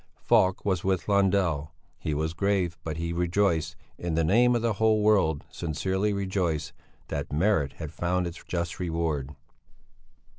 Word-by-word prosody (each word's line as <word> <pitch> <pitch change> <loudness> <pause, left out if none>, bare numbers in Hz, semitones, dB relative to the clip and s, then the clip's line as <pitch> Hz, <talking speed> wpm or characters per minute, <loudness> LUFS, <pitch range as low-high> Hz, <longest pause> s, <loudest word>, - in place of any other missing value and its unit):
Falk 95 0 +2
was 95 -3 0
with 95 -2 0
Lundell. 95 -7 +1 0.2
He 75 - -2
was 80 +2 -1
grave, 95 -1 0
but 80 -1 -4
he 85 0 -2
rejoiced, 85 -2 +1 0.2
in 85 -2 -2
the 80 - +2
name 120 +8 +4
of 115 - 0
the 115 -2 +2
whole 110 -1 +4
world 95 -9 +3
sincerely 95 +5 -1
rejoiced, 90 -6 -1 0.4
that 70 - -4
merit 80 -3 +1
had 80 -3 -7
found 90 +1 0
its 85 0 -7
just 85 -1 -3
reward. 80 -5 -2
85 Hz, 150 wpm, -27 LUFS, 80-100 Hz, 0.4 s, name